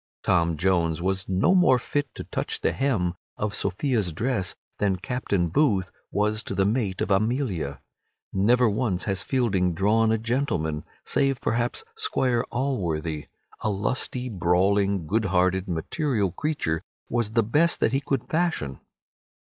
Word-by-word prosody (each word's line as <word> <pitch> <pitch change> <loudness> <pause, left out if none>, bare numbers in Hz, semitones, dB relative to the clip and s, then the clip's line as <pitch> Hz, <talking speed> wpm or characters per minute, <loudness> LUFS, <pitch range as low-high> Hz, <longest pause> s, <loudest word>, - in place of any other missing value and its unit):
Tom 85 -3 +2
Jones 85 -2 +1
was 95 +1 -2
no 95 - +3
more 180 -9 +5
fit 145 +4 -2
to - - -6
touch - - -3
the - - +2
hem 115 -11 0 0.2
of 105 0 -2
Sophia's 105 - 0
dress 100 +2 -1 0.2
than 100 -2 +2
Captain 100 -3 -1
Booth 95 - +2 0.2
was 105 +1 0
to 100 - -5
be - - -8
the 95 - +3
mate 105 -3 0
of - - -1
Amelia. 100 - 0 0.5
Never 120 +6 +4
once 105 -4 0
has 95 -3 -1
Fielding 95 -9 +1
drawn 110 +4 +3
a 110 - +3
gentleman, 110 - -1 0.2
save 135 -2 +1
perhaps 120 - 0
Squire 130 - +2
Alworthy. 85 - -2 0.3
A - - -1
lusty, 125 +5 -1
brawling, 95 -1 +2
good 110 +7 0
hearted, 95 +1 +1
material 100 - -1
creature 80 - -1 0.3
was 115 -2 -1
the 115 - +4
best 150 +10 +2
that 110 - +2
he 135 - +2
could 135 -3 -2
fashion. 160 - -1
105 Hz, 150 wpm, -25 LUFS, 90-125 Hz, 0.5 s, more